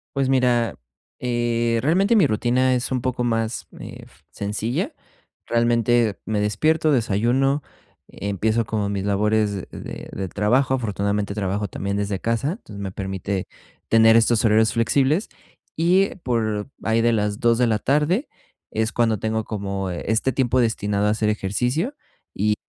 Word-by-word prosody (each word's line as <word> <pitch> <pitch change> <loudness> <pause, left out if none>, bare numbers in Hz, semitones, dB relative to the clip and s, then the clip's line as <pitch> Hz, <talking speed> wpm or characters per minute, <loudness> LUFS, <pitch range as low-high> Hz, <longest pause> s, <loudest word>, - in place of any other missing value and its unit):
Pues 135 -1 +1
mira, 125 -3 +2 0.4
eh, 120 -1 0
realmente 190 - +3
mi 195 - +5
rutina 125 +4 +2
es 125 +1 -1
un 130 -1 0
poco 125 0 -1
más, 115 -1 -1
ef - - -11
sencilla, 115 - -3 0.5
realmente 120 -2 +2
me 110 -1 -1
despierto, 155 +10 +2
desayuno, 125 +4 +1 0.5
empiezo 110 +3 -1
como 105 -2 -2
mis 100 -1 -2
labores 105 -1 0
de - - -8
del 95 -1 -4
trabajo, 120 +8 +2
afortunadamente 100 -3 -2
trabajo 100 0 -1
también 100 +2 -3
desde 100 -1 -2
casa, 115 - -1
entonces 105 - -11
me 95 - -4
permite 95 0 -4 0.4
tener 115 0 +6
estos 115 0 +3
horarios 110 +1 +4
flexibles, 135 - +1 0.5
y 180 +4 +2
por 110 -3 -1
ahí 110 +1 +2
de 120 0 +3
las 105 -1 -1
2 115 -1 +3
de 125 - +3
la 110 -2 +2
tarde 150 - +1 0.4
es 110 0 -1
cuando 115 -3 +1
tengo 110 0 -1
como, 100 -3 -3
eh, 85 - -5
este 115 +4 +1
tiempo 130 -1 +1
destinado 105 -3 0
a - - +3
hacer 110 0 0
ejercicio 125 - -1 0.4
y 105 +2 +1
115 Hz, 150 wpm, -22 LUFS, 105-125 Hz, 0.5 s, tener